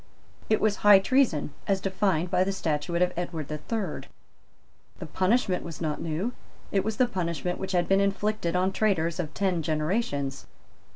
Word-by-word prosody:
It 215 - +3
was 215 -1 +1
high 205 -1 +8
treason 195 - +1
as 195 -1 +2
defined 185 -3 0
by 185 - +3
the 195 - -1
Statute 170 -1 0
of 180 - 0
Edward 170 -4 -4
the 150 0 -4
Third. 210 -6 -4 0.9
The - - -7
punishment 190 -1 +1
was 165 -2 -8
not 155 -3 -2
new. 170 +10 -2 0.4
It 195 - +2
was 220 0 -3
the 255 - +5
punishment 180 - -3
which 190 0 -4
had 175 -1 +2
been 195 0 +4
inflicted 200 -2 0
on 185 +1 +2
traitors 175 -6 0
of 155 -4 -3
ten 185 -4 0
generations. 155 - -1
185 Hz, 170 wpm, -27 LUFS, 165-200 Hz, 0.9 s, high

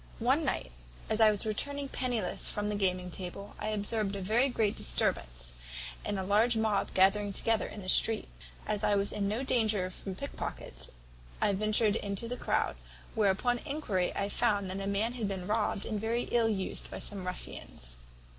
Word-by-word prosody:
"One - - +3
night, 65 - -1 0.4
as 220 +1 +2
I 220 - +8
was 210 -1 +2
returning 280 +6 -1
pennyless 245 -6 -1
from 210 0 -2
the 210 - -1
gaming 180 -2 0
table, 190 +3 -6
I - - -3
observed 210 -1 0
a 195 - -4
very 235 +8 +3
great 220 -4 +1
disturbance, - - 0 0.5
and 205 -1 -2
a 190 - -1
large 220 +5 +3
mob 220 -2 +1
gathered 195 +1 +4
together 225 -1 +1
in 205 - -8
the - - -8
street. 220 +3 +4 0.4
As 215 0 -1
I 210 - +4
was 200 0 +1
in 200 -1 -1
no 220 +6 -1
danger 215 -8 +1
from 190 +1 -6
pickpockets, 65 - -6 0.5
I 205 - +3
ventured 215 +1 +3
into 200 +3 -1
the 245 - -3
croud, - - 0 0.4
where 215 -4 +3
upon 245 +5 +1
enquiry 255 -12 -1
I 200 - 0
found 205 -3 +1
that 190 - -3
a 195 - -3
man 205 +4 +1
had 235 -4 -2
been 190 -2 -3
robbed 210 0 0
and 215 -2 -2
very 230 +2 0
ill 230 -2 +4
used 190 -3 -1
by - - -6
some 200 -2 -2
ruffians. - - -6
205 Hz, 185 wpm, -31 LUFS, 190-225 Hz, 0.5 s, I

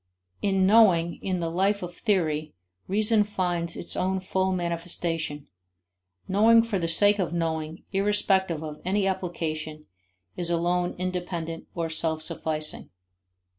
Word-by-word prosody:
In 195 -2 +2
knowing, 185 -6 +4
in 185 -2 -2
the 165 -1 -2
life 195 +3 +1
of 175 0 -6
theory, 155 -8 -1 0.3
reason 210 +2 +4
finds 175 -4 -1
its 170 - -4
own 190 +1 0
full 190 0 -1
manifestation; 170 -3 -2 0.8
knowing 225 +4 +5
for 225 -4 -2
the 165 - -1
sake 205 +5 +5
of 175 -2 -1
knowing 160 -1 -3
irrespective 195 -4 +1
of 150 -1 -7
any 195 +2 +1
application 160 -5 -3 0.5
is 175 -1 -2
alone 175 +1 0
independent, 175 -2 -4
or 170 -1 -1
self 160 -1 -2
sufficing. 155 -1 -2
175 Hz, 130 wpm, -26 LUFS, 165-190 Hz, 0.8 s, knowing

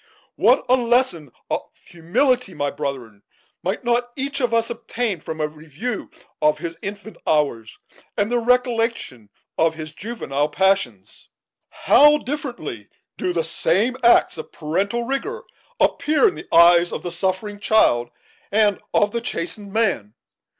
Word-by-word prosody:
"What - - +3
a 255 - +5
lesson 240 - +1 0.2
of - - 0 0.2
humility, 190 - 0
my 145 0 -1
brethren, 120 -7 -5 0.4
might 190 +7 -3
not 240 0 0
each 275 +1 -3
of 245 -2 +1
us 230 0 +1
obtain 230 -4 -3
from 160 +1 -7
a 155 - +1
review 160 - -6 0.3
of 150 0 +3
his 165 +1 -6
infant 205 0 -7
hours, 130 -8 0 0.4
and 205 +2 0
the 245 - +2
recollection 230 - 0 0.3
of 160 0 +3
his 155 -1 -7
juvenile 155 -8 -3
passions! 190 - -1 0.4
How 295 +1 +5
differently 245 - -6 0.3
do 180 - 0
the 170 -2 0
same 170 +8 0
acts 235 -7 +4
of - - -8
parental 195 +9 -2
rigor 410 - -3 0.4
appear 310 +9 +3
in 380 - 0
the 355 - -10
eyes 170 +1 +6
of - - -5
the 175 - -4
suffering 190 +4 -2
child 120 - +3 0.4
and 205 -1 +2
of 205 0 +3
the 235 - -2
chastened 200 -2 -4
man! 195 - 0
200 Hz, 145 wpm, -21 LUFS, 160-240 Hz, 0.4 s, eyes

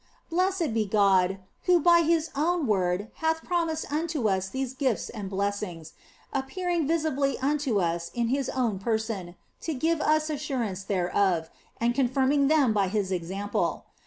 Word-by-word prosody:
Blessed 365 - +1
be 220 -2 0
God, 195 -2 +3 0.3
who 360 -1 +5
by 340 +1 +6
His 325 -1 +1
own 330 +2 +1
word 195 -1 0
hath 320 0 0
promised 330 -4 -1
unto 305 -6 0
us 190 -1 0
these 265 +2 -3
gifts 260 -4 -1
and 205 -4 -6
blessings, 195 -5 -3 0.4
appearing 335 +4 -1
visibly 300 -4 +1
unto 275 -5 0
us 170 -1 -1
in 235 -1 0
His 270 0 0
own 235 -7 -1
person 220 -4 -2 0.3
to 320 - -3
give 320 +4 +1
us 310 +1 +2
assurance 255 -10 -3
thereof, 180 -3 0 0.3
and 235 +1 +2
confirming 270 +2 +2
them 285 -6 +4
by 200 -2 +2
His 200 -1 -1
example. 190 +3 -2
255 Hz, 150 wpm, -27 LUFS, 200-310 Hz, 0.4 s, by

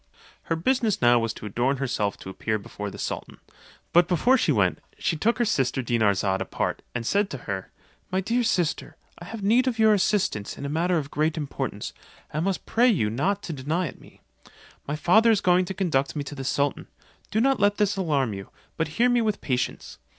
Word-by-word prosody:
Her 165 - 0
business 225 +5 +1
now 120 0 +5
was 115 -1 -1
to - - -10
adorn 120 +7 0
herself 120 -7 -1
to 95 - -8
appear 110 +3 -2
before 105 0 -7
the - - -10
sultan; - - -5 0.6
but 175 -1 +6
before 185 +10 +3
she 255 - +2
went, - - +2 0.2
she 165 - 0
took 225 +10 +1
her 240 - +2
sister 135 - 0
Dinarzade 100 -5 +1
apart, - - -2
and 115 -1 -2
said 200 - +1
to 140 - -5
her, 95 -2 -4 0.4
"My 185 - +1
dear 230 +6 0
sister, 180 -8 -1 0.2
I 175 - -9
have 220 +2 -7
need 240 +6 +4
of 240 -3 0
your 220 -1 +5
assistance 190 - 0
in 140 - -6
a - - -2
matter 170 +4 +1
of 145 -2 -4
great 155 +2 0
importance, 145 -3 -4 0.4
and 155 +4 -1
must 195 -1 -2
pray 240 +2 +3
you 155 - +2
not 190 - 0
to 165 - -4
deny 155 +6 -1
it - - -14
me. - - -18 0.7
My 145 - -1
father 220 +9 +4
is 220 -3 +4
going 180 -1 +3
to 190 - -4
conduct 160 -8 0
me 145 - -2
to 140 - -8
the 135 -2 -6
sultan; 140 +2 -1 0.4
do 220 - 0
not 270 +2 +3
let 205 0 +3
this 210 -1 +2
alarm 145 - 0
you, 95 0 -8 0.3
but 160 - 0
hear 240 +2 +5
me 245 -1 +3
with 215 -3 0
patience. 125 -2 -3
165 Hz, 210 wpm, -25 LUFS, 130-205 Hz, 0.7 s, but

